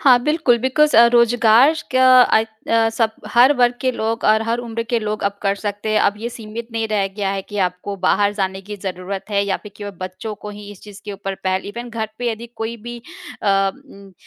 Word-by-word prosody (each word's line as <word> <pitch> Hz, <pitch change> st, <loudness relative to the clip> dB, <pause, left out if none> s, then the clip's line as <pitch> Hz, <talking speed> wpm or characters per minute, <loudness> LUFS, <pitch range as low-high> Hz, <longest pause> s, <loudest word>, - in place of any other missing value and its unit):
हाँ, 255 Hz, -3 st, +6 dB
बिल्कुल 300 Hz, -5 st, +2 dB
बिकॉज़ 285 Hz, +5 st, +2 dB
अ, 235 Hz, -, +8 dB
रोज़गार 240 Hz, +4 st, +5 dB, 0.2 s
का 260 Hz, 0 st, +5 dB, 0.2 s
अ 220 Hz, -2 st, +3 dB, 0.2 s
अ, 225 Hz, 0 st, +3 dB
सब 225 Hz, -1 st, +1 dB, 0.2 s
हर 250 Hz, +4 st, +6 dB
वर्ग 245 Hz, 0 st, +3 dB
के 260 Hz, -1 st, +1 dB
लोग 225 Hz, 0 st, -3 dB
और 220 Hz, +1 st, +4 dB
हर 230 Hz, +1 st, -1 dB
उम्र 230 Hz, -1 st, -4 dB
के 235 Hz, -, +2 dB
लोग 215 Hz, -1 st, -4 dB
अब 200 Hz, 0 st, -1 dB
कर 200 Hz, 0 st, +1 dB
सकते 205 Hz, +1 st, -4 dB
हैं। 215 Hz, -, +3 dB
अब 205 Hz, -, +2 dB
ये 235 Hz, +2 st, -4 dB
सीमित 230 Hz, 0 st, -8 dB
नहीं 225 Hz, -1 st, -1 dB
रह 205 Hz, -2 st, +1 dB
गया 195 Hz, -2 st, -1 dB
है 195 Hz, -1 st, -3 dB
कि 205 Hz, +1 st, -7 dB
आपको 180 Hz, +3 st, -6 dB
बाहर 205 Hz, +2 st, +2 dB
जाने 190 Hz, -1 st, -2 dB
की 210 Hz, +2 st, -8 dB
ज़रूरत 190 Hz, 0 st, -5 dB
है 200 Hz, 0 st, +2 dB
या 195 Hz, -1 st, -1 dB
फिर 210 Hz, -2 st, -13 dB
कि 205 Hz, -, -8 dB
व 205 Hz, -, -5 dB
बच्चों 185 Hz, +4 st, -6 dB
को 210 Hz, -, -9 dB
ही 205 Hz, 0 st, -10 dB
इस 200 Hz, -, -13 dB
चीज़ 205 Hz, -1 st, -12 dB
के 205 Hz, -, -6 dB
ऊपर 195 Hz, 0 st, -5 dB
पहल 185 Hz, 0 st, 0 dB
इवन 235 Hz, +3 st, -7 dB
घर 220 Hz, -1 st, -3 dB
पे 240 Hz, -1 st, -1 dB
यदि 230 Hz, +2 st, -6 dB
कोई 225 Hz, +1 st, -4 dB
भी 240 Hz, +2 st, -8 dB, 0.5 s
अ -, -, -3 dB, 0.2 s
उम 200 Hz, -7 st, -16 dB
220 Hz, 235 wpm, -19 LUFS, 200-235 Hz, 0.5 s, अ